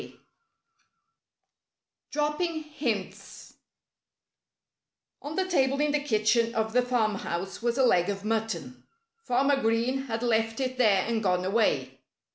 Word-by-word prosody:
X - - -12 2.0
DROPPING 305 +2 -1
HINTS 255 -10 -5 1.7
On 295 +2 -6
the 380 - +1
table 275 -6 +1
in 295 0 +2
the 295 - +1
kitchen 230 -3 +1
of 220 0 -1
the 250 - +4
farmhouse 215 -7 -2
was 235 +1 0
a 265 - +3
leg 180 -5 +3
of 200 0 -4
mutton. 215 - -3 0.4
Farmer 275 +2 +2
Green 235 +4 0
had 225 0 -3
left 225 -1 +1
it 255 -1 -3
there 200 -6 +4
and 230 -1 -1
gone 180 -3 +1
away. 220 +4 0
230 Hz, 125 wpm, -27 LUFS, 215-270 Hz, 2.0 s, the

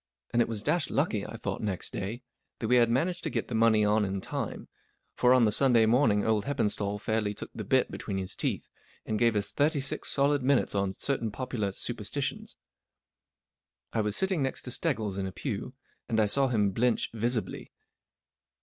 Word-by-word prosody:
And 120 - +4
it - - +2
was 110 -2 -4
dashed 170 +4 +1
lucky, 135 - 0
I - - -8
thought 100 -3 -4
next 100 -4 -3
day, 115 +6 -4 0.3
that 110 - -3
we 125 +2 +5
had 120 -1 +4
managed 165 +9 0
to - - -2
get - - -3
the - - -4
money 110 -1 +4
on 105 +1 +3
in 95 0 -2
time, - - -5 0.5
for 125 - +3
on 125 -2 +6
the 105 - +3
Sunday 120 -1 +5
morning 110 -3 +3
old 110 -2 +1
Heppenstali 105 -6 -1
fairly 105 -1 -1
took - - -8
the - - -5
bit - - +2
between 95 - -4
his 95 -1 -5
teeth, - - -2 0.4
and 110 -1 -1
gave 115 -2 +3
us 105 0 -1
thirty 145 +5 +2
six 140 +1 -2
solid 140 0 +2
minutes 135 +1 +2
on 100 -1 0
Certain 125 0 -1
Popular 110 -3 -3
Superstitions. - - -4 1.4
I 115 - +1
was 105 -1 -1
sitting 190 -4 +1
next 135 -1 -2
to 125 - -5
Steggles 110 - -1
in 95 - -1
the 95 - -4
pew, 125 +3 -5 0.3
and 110 - +1
I 110 - +5
saw 135 +6 +2
him 105 -5 +2
blench 120 +4 +1
visibly. 115 +1 -2
115 Hz, 195 wpm, -29 LUFS, 105-130 Hz, 1.4 s, on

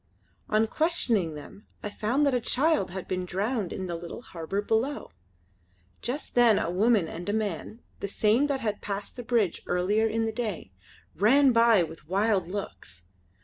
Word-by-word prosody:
On 215 +1 +3
questioning 225 - +1
them 150 +8 -12 0.2
I 210 - -4
found 245 +9 0
that 280 - +2
a 250 - +1
child 290 - +2
had 185 +1 -6
been 185 0 -2
drowned 200 +2 -2
in 190 - -4
the 175 -2 -4
little 170 +7 -8
harbour 175 +1 -4
below. 235 +7 -1 0.9
Just 260 +6 -4
then 235 -4 +5
a 170 - -1
woman 205 -1 +3
and 175 +4 -6
a - - 0
man, 215 +1 -3 0.2
the - - -3
same 220 +7 +2
that 275 -2 -1
had 210 -2 -2
passed 200 0 -5
the 245 - -6
bridge 230 -7 0
earlier 200 +5 +1
in 225 +1 0
the 225 - -1
day, 215 - -4 0.4
ran 265 +7 +5
by 230 -5 +5
with 160 -1 -9
wild 195 -2 +1
looks. 180 - -7
215 Hz, 175 wpm, -27 LUFS, 185-235 Hz, 0.9 s, then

